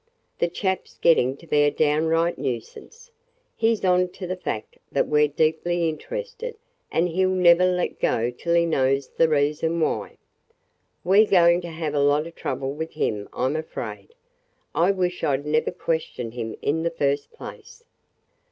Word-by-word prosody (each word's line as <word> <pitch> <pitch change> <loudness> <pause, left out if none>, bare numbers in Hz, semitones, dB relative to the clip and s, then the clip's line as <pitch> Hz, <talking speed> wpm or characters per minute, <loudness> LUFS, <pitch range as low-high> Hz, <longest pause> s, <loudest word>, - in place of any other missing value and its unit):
"The 170 - +2
chap 190 +2 -2
's - - -21
getting 135 -5 +3
to 170 - -16
be 150 - 0
a 145 - +5
downright 160 +3 +1
nuisance. 140 - -6 0.4
He 230 0 +2
's 200 - -5
on 180 0 +3
to 190 - -7
the 185 +1 -3
fact 110 -12 -5
that - - +1
we 150 0 +3
're - - +4
deeply 160 +3 0
interested 485 - -5 0.4
and 170 +2 +2
he 180 +2 0
'll 185 - +3
never 180 -1 +5
let 180 -1 -1
go 115 +2 +1
till 170 +7 -1
he 170 0 +4
knows 135 -3 +1
the 165 - +2
reason 150 +3 +1
why. 160 - -1 0.9
We 195 +4 +6
're 215 - -4
going 175 -2 +5
to 175 - -7
have 160 -2 -4
a 145 - +1
lot 145 +2 +3
of 170 - -9
trouble 135 -1 -3
with 160 +2 -5
him, 105 -1 -2
I 125 - -2
'm 135 +4 0
afraid. 160 - -6 0.6
I 175 +3 +3
wish 180 -2 -1
I 140 -2 +2
'd 140 - -10
never 155 +1 +1
questioned 160 -9 -3
him 115 -2 -5
in 160 +3 +1
the 170 - 0
first 145 - -1
place. 465 0 -11
165 Hz, 185 wpm, -24 LUFS, 145-180 Hz, 0.9 s, We